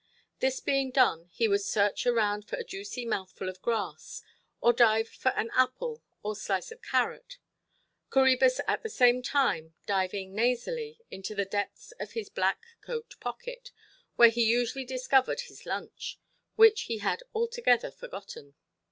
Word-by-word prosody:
This 265 Hz, 0 st, +1 dB
being 275 Hz, -1 st, +1 dB
done, 240 Hz, -10 st, +2 dB
he 225 Hz, +6 st, +1 dB
would 200 Hz, -1 st, +2 dB
search 205 Hz, +3 st, +1 dB
around 210 Hz, -3 st, +2 dB
for -, -, -2 dB
a -, -, -4 dB
juicy 205 Hz, +5 st, -6 dB
mouthful 190 Hz, -4 st, -3 dB
of 185 Hz, 0 st, -10 dB
grass, 225 Hz, -3 st, -3 dB, 0.4 s
or 240 Hz, -, +5 dB
dive 225 Hz, -2 st, +4 dB
for 260 Hz, -, -1 dB
an 230 Hz, -, -2 dB
apple 455 Hz, -, +1 dB, 0.2 s
or 210 Hz, +1 st, -2 dB
slice 195 Hz, -, -2 dB
of 460 Hz, +2 st, -12 dB
carrot—Coræbus 265 Hz, -, 0 dB
at -, -, +1 dB
the 450 Hz, -, -5 dB
same 250 Hz, -, +4 dB
time 245 Hz, -, 0 dB
diving 190 Hz, -1 st, -1 dB
nasally—into 250 Hz, -, -2 dB
the 200 Hz, -1 st, 0 dB
depths 205 Hz, -, -4 dB
of -, -, -6 dB
his 455 Hz, -2 st, -4 dB
black -, -, 0 dB, 0.2 s
coat 475 Hz, +1 st, -6 dB
pocket, -, -, -7 dB, 0.4 s
where 235 Hz, -1 st, +9 dB
he 235 Hz, +1 st, +1 dB
usually 240 Hz, +3 st, +1 dB
discovered 260 Hz, -, +2 dB
his 485 Hz, -, -13 dB
lunch, -, -, -5 dB, 0.4 s
which 440 Hz, -1 st, +7 dB
he 230 Hz, -, -1 dB
had 210 Hz, -, -1 dB
altogether 470 Hz, +2 st, +2 dB
forgotten. 485 Hz, -2 st, -10 dB
245 Hz, 145 wpm, -29 LUFS, -, 0.4 s, where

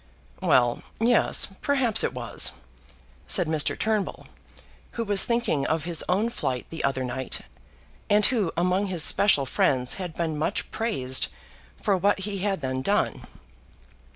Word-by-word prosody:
"Well; 120 Hz, -1 st, +3 dB, 0.2 s
yes; 235 Hz, +1 st, +3 dB
perhaps 265 Hz, -6 st, +1 dB
it -, -, 0 dB
was," -, -, 0 dB, 0.7 s
said 180 Hz, -, +4 dB
Mr. 155 Hz, -2 st, +1 dB
Turnbull, 215 Hz, -3 st, -1 dB, 0.7 s
who 230 Hz, -, -2 dB
was 205 Hz, -2 st, +2 dB
thinking 235 Hz, -, 0 dB
of 160 Hz, -1 st, 0 dB
his 170 Hz, -1 st, -2 dB
own 210 Hz, +6 st, +1 dB
flight 130 Hz, -, -3 dB
the 165 Hz, -, -5 dB
other 135 Hz, -1 st, 0 dB
night, 130 Hz, +1 st, -4 dB, 0.7 s
and 210 Hz, 0 st, +4 dB
who 215 Hz, -10 st, +1 dB
among 180 Hz, +3 st, +1 dB
his 180 Hz, -4 st, -1 dB
special 180 Hz, -9 st, +5 dB
friends 125 Hz, -1 st, +1 dB
had 175 Hz, -3 st, -6 dB
been 160 Hz, -3 st, -2 dB
much 160 Hz, -, -2 dB
praised 130 Hz, -, 0 dB, 0.5 s
for 200 Hz, -, +1 dB
what 195 Hz, +1 st, +1 dB
he 200 Hz, 0 st, -3 dB
had 195 Hz, -3 st, -1 dB
then 130 Hz, -1 st, -2 dB
done. 200 Hz, +9 st, 0 dB
180 Hz, 145 wpm, -25 LUFS, 140-210 Hz, 0.7 s, special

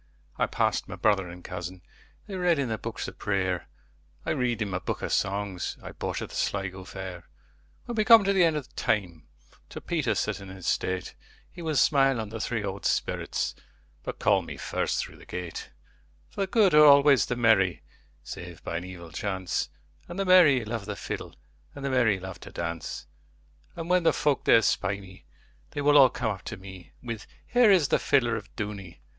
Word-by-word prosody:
I -, -, +3 dB
passed -, -, 0 dB
my -, -, -6 dB
brother 95 Hz, -4 st, +1 dB
and 90 Hz, +1 st, -11 dB
cousin:They 90 Hz, -, -10 dB
read 180 Hz, -3 st, +2 dB
in 135 Hz, -4 st, -1 dB
their 110 Hz, -1 st, -2 dB
books 115 Hz, -1 st, -5 dB
of -, -, -10 dB
prayer;I 95 Hz, -10 st, -4 dB
read 125 Hz, -6 st, 0 dB
in 100 Hz, -, -5 dB
my 90 Hz, -, -1 dB
book -, -, -4 dB
of -, -, -2 dB
songsI 100 Hz, -2 st, -2 dB
bought -, -, -3 dB
at -, -, -7 dB
the -, -, -10 dB
Sligo 95 Hz, -1 st, -2 dB
fair. 95 Hz, -3 st, -7 dB, 0.6 s
When 240 Hz, -, -5 dB
we 215 Hz, -, +4 dB
come 225 Hz, -2 st, +8 dB
at 200 Hz, -, +3 dB
the 190 Hz, -2 st, +4 dB
end 165 Hz, -2 st, +3 dB
of 145 Hz, -4 st, -6 dB
time, 95 Hz, -9 st, -1 dB, 0.4 s
To -, -, -7 dB
Peter -, -, -1 dB
sitting 100 Hz, -1 st, -2 dB
in 95 Hz, -1 st, -10 dB
state, 95 Hz, +1 st, -1 dB, 0.4 s
He 175 Hz, -, -10 dB
will 160 Hz, -2 st, -2 dB
smile 135 Hz, -2 st, +4 dB
on 110 Hz, -2 st, -4 dB
the 110 Hz, +1 st, -6 dB
three 110 Hz, +1 st, -2 dB
old 100 Hz, -1 st, -5 dB
spirits, -, -, -1 dB, 0.5 s
But -, -, -6 dB
call -, -, +3 dB
me -, -, -8 dB
first -, -, -1 dB
through -, -, -4 dB
the -, -, -15 dB
gate; 90 Hz, -2 st, -6 dB, 0.6 s
For -, -, -4 dB
the 195 Hz, -, +1 dB
good 200 Hz, -2 st, +4 dB
are 150 Hz, 0 st, +8 dB
always 140 Hz, -1 st, +7 dB
the 125 Hz, -, -1 dB
merry, 110 Hz, -7 st, +3 dB, 0.4 s
Save 85 Hz, -2 st, -9 dB
by 85 Hz, -, -3 dB
an 85 Hz, -, -5 dB
evil 90 Hz, -3 st, -9 dB
chance, 95 Hz, 0 st, -2 dB, 0.4 s
And 175 Hz, -, -8 dB
the 195 Hz, -, 0 dB
merry 160 Hz, -10 st, +6 dB
love 110 Hz, -2 st, -4 dB
the 105 Hz, -, -3 dB
fiddleAnd -, -, -6 dB, 0.4 s
the 140 Hz, -1 st, -3 dB
merry 115 Hz, -7 st, +3 dB
love 95 Hz, 0 st, -8 dB
to -, -, -11 dB
dance:And 85 Hz, -, -8 dB
when 180 Hz, 0 st, +3 dB
the 165 Hz, -, +3 dB
folk 145 Hz, -3 st, 0 dB
there 115 Hz, -, +6 dB
spy 100 Hz, 0 st, +1 dB
me, 95 Hz, -1 st, -14 dB, 0.4 s
They 145 Hz, -, -4 dB
will 145 Hz, +1 st, +4 dB
all 130 Hz, -2 st, +8 dB
come 110 Hz, -, -2 dB
up 95 Hz, -3 st, -6 dB
to 115 Hz, -, -5 dB
me, 95 Hz, -2 st, -11 dB
With 115 Hz, -3 st, -6 dB, 0.2 s
'Here 245 Hz, -2 st, +4 dB
is 180 Hz, -8 st, +5 dB
the -, -, +3 dB
fiddler 120 Hz, -5 st, +2 dB
of 105 Hz, -3 st, -6 dB
Dooney! 100 Hz, -5 st, -6 dB
105 Hz, 195 wpm, -27 LUFS, 95-145 Hz, 0.6 s, come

